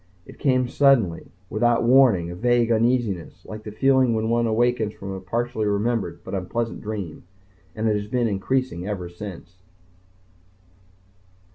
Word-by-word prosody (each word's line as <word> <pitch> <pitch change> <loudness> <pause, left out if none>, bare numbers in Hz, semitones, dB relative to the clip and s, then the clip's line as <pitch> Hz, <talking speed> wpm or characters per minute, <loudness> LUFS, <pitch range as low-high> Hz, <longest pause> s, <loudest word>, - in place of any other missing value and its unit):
It - - -14
came 130 -2 +2
suddenly, 120 -11 +2 0.2
without 120 +4 +2
warning, 120 -9 +4
a - - -6
vague 120 +3 +2
uneasiness, 115 -5 0
like 110 0 -8
the 105 - -8
feeling 130 +1 +3
when 110 +1 -1
one 120 0 +2
awakens 115 -1 +1
from 100 0 -7
a 95 - -5
partially 115 +2 -2
remembered 105 +2 -1
but - - -8
unpleasant 115 +5 -3
dream. 105 -7 -5 0.5
And 110 0 -1
it 105 - +2
has 105 0 -3
been 120 +1 0
increasing 105 -2 -1
ever 90 -4 -4
since. 90 -1 -9
110 Hz, 145 wpm, -23 LUFS, 100-120 Hz, 0.5 s, warning